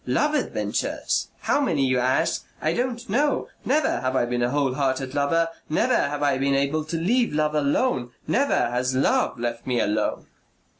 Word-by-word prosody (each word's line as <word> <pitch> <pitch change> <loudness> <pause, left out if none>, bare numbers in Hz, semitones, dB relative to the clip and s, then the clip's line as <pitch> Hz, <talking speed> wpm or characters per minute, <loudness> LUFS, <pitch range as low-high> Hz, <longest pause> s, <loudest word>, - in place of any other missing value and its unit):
love 300 +1 +1
adventures. 300 - -1
How - - +1
many? 140 - +1
you 130 -1 +2
ask. 130 +1 +1 0.2
I 155 - 0
don't 245 +2 -2
know. 280 +7 0
Never 300 +4 +1
have 130 0 -1
I 125 - +2
been 120 0 -2
a 120 - +2
whole 140 -1 +1
hearted 130 -1 -1
lover; 165 +4 +1 0.2
never 155 - +2
have 145 0 0
I 140 -2 +2
been 140 0 +2
able 140 +3 0
to 165 +2 -3
leave 235 +9 +1
love 150 0 0
alone.... 145 - +1 0.2
Never 265 - +1
has 125 +1 0
love 130 - +1
left 120 0 -4
me 125 -2 +1
alone. 105 +1 -1
140 Hz, 180 wpm, -24 LUFS, 130-170 Hz, 0.2 s, you